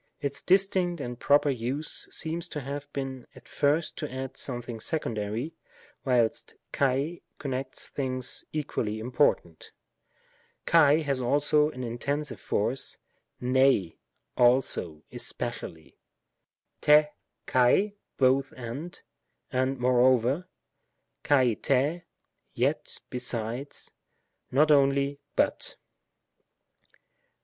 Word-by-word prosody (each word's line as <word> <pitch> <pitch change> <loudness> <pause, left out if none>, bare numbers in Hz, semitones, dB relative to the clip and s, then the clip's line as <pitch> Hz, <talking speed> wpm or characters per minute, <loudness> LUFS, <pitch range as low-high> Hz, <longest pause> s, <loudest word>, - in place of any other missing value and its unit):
Its 140 -1 -3
distinct 185 -2 +2
and 125 -3 -5
proper 145 0 +4
use 130 +5 -3
seems 165 +2 -4
to 150 - -4
have 145 +2 -6
been 135 -3 -5
at - - -15
first 150 +3 +1
to 150 - -4
add 130 0 -5
something 120 -3 -4
secondary, 115 0 -2 0.5
whilst 120 -4 +1 0.2
xal 140 +5 0 0.2
connects 130 -1 -4
things 130 -2 -2
equally 120 -8 -2
important, 110 - 0 0.9
xal 160 -1 +5
has 140 -3 -1
also 145 +4 +3
an 130 -4 -7
intensive 140 +5 -3
foTce=7ia/f/, 125 -2 0 0.4
aleo^ 120 - +2
especially, 120 -9 -5 0.9
n 150 0 +7 0.2
— - - -54
xaly 130 +12 +3 0.2
"both 135 +1 +3
—and," 130 +8 -7 0.5
"and 130 +1 0
moreover;" 125 +5 +3 0.8
xal—rsy 135 +4 +2 0.5
"yet - - -1
— - - -54
besides," 125 +2 -3 0.6
"not 150 +4 +4
only 140 0 +3
— - - -50
but." - - 0
135 Hz, 95 wpm, -28 LUFS, 125-145 Hz, 0.9 s, n